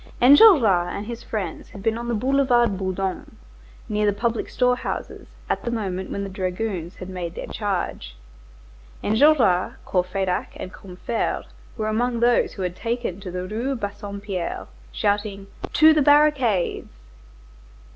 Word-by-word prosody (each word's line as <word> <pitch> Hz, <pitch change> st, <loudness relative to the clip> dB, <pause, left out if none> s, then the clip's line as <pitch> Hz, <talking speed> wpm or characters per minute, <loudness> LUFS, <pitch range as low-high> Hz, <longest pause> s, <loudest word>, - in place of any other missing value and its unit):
Enjolras 250 Hz, -, +7 dB
and 205 Hz, -, -5 dB
his 235 Hz, +1 st, -6 dB
friends 195 Hz, -8 st, -5 dB
had 195 Hz, -, -11 dB
been 225 Hz, 0 st, +1 dB
on 235 Hz, +1 st, -5 dB
the 235 Hz, -, 0 dB
Boulevard 245 Hz, -2 st, +2 dB
Bourdon, 190 Hz, 0 st, -4 dB, 0.5 s
near 210 Hz, 0 st, 0 dB
the -, -, +4 dB
public 235 Hz, -1 st, -1 dB
storehouses, 250 Hz, 0 st, -1 dB, 0.2 s
at -, -, -1 dB
the -, -, -2 dB
moment 190 Hz, -5 st, -3 dB
when 200 Hz, -, -3 dB
the -, -, -4 dB
dragoons 185 Hz, -2 st, -3 dB
had 185 Hz, -, -8 dB
made 180 Hz, -3 st, -5 dB
their -, -, -5 dB
charge. 180 Hz, -, -3 dB, 0.9 s
Enjolras, 220 Hz, -6 st, +4 dB
Courfeyrac, 185 Hz, 0 st, -1 dB
and 185 Hz, -, -7 dB
Combeferre 190 Hz, +4 st, -3 dB, 0.3 s
were 215 Hz, -1 st, -2 dB
among 235 Hz, +2 st, 0 dB
those 240 Hz, +1 st, +3 dB
who 195 Hz, -, -5 dB
had 180 Hz, -1 st, -3 dB
taken 230 Hz, -4 st, -3 dB
to 195 Hz, -2 st, -7 dB
the 180 Hz, +1 st, -4 dB
Rue 235 Hz, +7 st, -2 dB
Bassompierre, 200 Hz, -3 st, -5 dB, 0.3 s
shouting: 200 Hz, -, -1 dB, 0.3 s
"To 315 Hz, +1 st, +7 dB
the 310 Hz, -, +3 dB
barricades!" 275 Hz, -, +2 dB
210 Hz, 140 wpm, -23 LUFS, 185-240 Hz, 0.9 s, Enjolras